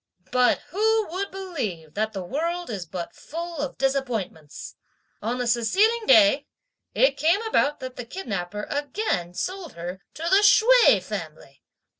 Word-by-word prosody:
"But 250 Hz, 0 st, +3 dB
who 435 Hz, +4 st, +1 dB
would 390 Hz, +3 st, -3 dB
believe 245 Hz, -, -5 dB
that 215 Hz, +1 st, -1 dB
the 195 Hz, -3 st, -5 dB
world 335 Hz, -, -3 dB
is 190 Hz, -5 st, -5 dB
but 175 Hz, 0 st, -6 dB
full 335 Hz, 0 st, -7 dB
of 285 Hz, -2 st, -4 dB
disappointments! 245 Hz, -, -3 dB, 0.5 s
On 235 Hz, +3 st, -2 dB
the 250 Hz, -, -2 dB
succeeding 395 Hz, -, +2 dB
day, 300 Hz, -, +5 dB, 0.5 s
it -, -, +3 dB
came 335 Hz, +6 st, +3 dB
about 295 Hz, -10 st, +1 dB
that 255 Hz, -1 st, -7 dB
the 245 Hz, -, -6 dB
kidnapper 210 Hz, -, -5 dB
again 285 Hz, -, -2 dB
sold 370 Hz, -, -4 dB
her 175 Hz, +3 st, -7 dB
to 320 Hz, -, -7 dB
the 360 Hz, +4 st, +4 dB
Hsüeh 450 Hz, +4 st, +6 dB
family! -, -, -8 dB
280 Hz, 145 wpm, -24 LUFS, -, 0.5 s, Hsüeh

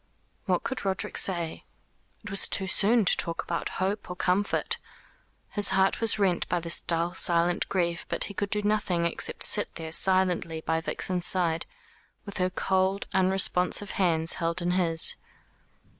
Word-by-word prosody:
What -, -, 0 dB
could 265 Hz, -, -4 dB
Roderick 190 Hz, -1 st, -3 dB
say? 170 Hz, -4 st, -2 dB, 0.6 s
It 210 Hz, -, -8 dB
was 195 Hz, -, +2 dB
too 195 Hz, -, 0 dB
soon 210 Hz, +4 st, +2 dB
to -, -, +3 dB
talk 165 Hz, -1 st, -2 dB
about 170 Hz, -, -3 dB
hope 195 Hz, +2 st, -2 dB
or 180 Hz, -, -5 dB
comfort. 185 Hz, +3 st, 0 dB, 0.7 s
His 205 Hz, -1 st, +1 dB
heart 190 Hz, +3 st, +2 dB
was 225 Hz, -1 st, +3 dB
rent 190 Hz, -4 st, 0 dB
by 175 Hz, -, +1 dB
this 170 Hz, 0 st, +1 dB
dull 170 Hz, +1 st, 0 dB
silent 175 Hz, -1 st, +1 dB
grief; 175 Hz, -1 st, -1 dB
but -, -, 0 dB
he 200 Hz, -, -5 dB
could 200 Hz, 0 st, -3 dB
do 210 Hz, 0 st, +1 dB
nothing 205 Hz, -5 st, 0 dB
except 170 Hz, -, +1 dB
sit 205 Hz, -, +2 dB
there 160 Hz, -1 st, -7 dB
silently 180 Hz, -3 st, +1 dB
by 160 Hz, +1 st, -1 dB
Vixen's 180 Hz, +1 st, 0 dB
side 170 Hz, -3 st, +1 dB, 0.6 s
with 200 Hz, -, -7 dB
her 185 Hz, 0 st, +1 dB
cold 190 Hz, +1 st, 0 dB
unresponsive 190 Hz, +1 st, +1 dB
hands 165 Hz, -3 st, +1 dB
held 165 Hz, +1 st, 0 dB
in 175 Hz, 0 st, -1 dB
his. 170 Hz, -3 st, +2 dB
185 Hz, 160 wpm, -27 LUFS, 170-195 Hz, 0.7 s, to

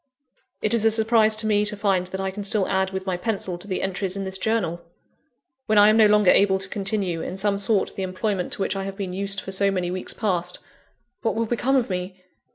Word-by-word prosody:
It 215 Hz, -, +3 dB
is 230 Hz, -2 st, +2 dB
a 225 Hz, -, +5 dB
surprise 220 Hz, 0 st, +3 dB
to 215 Hz, +1 st, +1 dB
me 210 Hz, -1 st, +2 dB
to 210 Hz, 0 st, 0 dB
find 195 Hz, -3 st, 0 dB
that 190 Hz, +1 st, -5 dB
I 190 Hz, 0 st, -2 dB
can 205 Hz, +2 st, -6 dB
still 200 Hz, -1 st, +2 dB
add 190 Hz, -1 st, 0 dB
with 190 Hz, 0 st, -5 dB
my 185 Hz, -2 st, -1 dB
pencil 190 Hz, -3 st, -3 dB
to 200 Hz, -, -8 dB
the 185 Hz, -, -3 dB
entries 190 Hz, 0 st, -2 dB
in 195 Hz, -, -3 dB
this 190 Hz, 0 st, -4 dB
Journal! 185 Hz, -6 st, -1 dB, 0.8 s
When 215 Hz, -, +2 dB
I 205 Hz, +1 st, +7 dB
am 215 Hz, -, +4 dB
no 220 Hz, -1 st, +7 dB
longer 210 Hz, -2 st, +5 dB
able 195 Hz, -1 st, +4 dB
to 195 Hz, +1 st, -2 dB
continue, 195 Hz, -4 st, -2 dB
in 185 Hz, -, -5 dB
some 200 Hz, 0 st, 0 dB
sort, 200 Hz, 0 st, +1 dB
the -, -, -5 dB
employment 190 Hz, 0 st, -2 dB
to 195 Hz, -, -2 dB
which 195 Hz, -, -2 dB
I 195 Hz, 0 st, -3 dB
have 195 Hz, 0 st, -6 dB
been 190 Hz, -3 st, -4 dB
used 195 Hz, +1 st, -1 dB
for 195 Hz, -, -7 dB
so 195 Hz, +1 st, +3 dB
many 180 Hz, -2 st, -2 dB
weeks 185 Hz, 0 st, -5 dB
past, 180 Hz, -5 st, -1 dB, 0.6 s
what 225 Hz, -, -1 dB
will 230 Hz, +1 st, 0 dB
become 245 Hz, +4 st, 0 dB
of 240 Hz, -6 st, +1 dB
me? 185 Hz, +1 st, -4 dB
195 Hz, 245 wpm, -23 LUFS, 190-215 Hz, 0.8 s, I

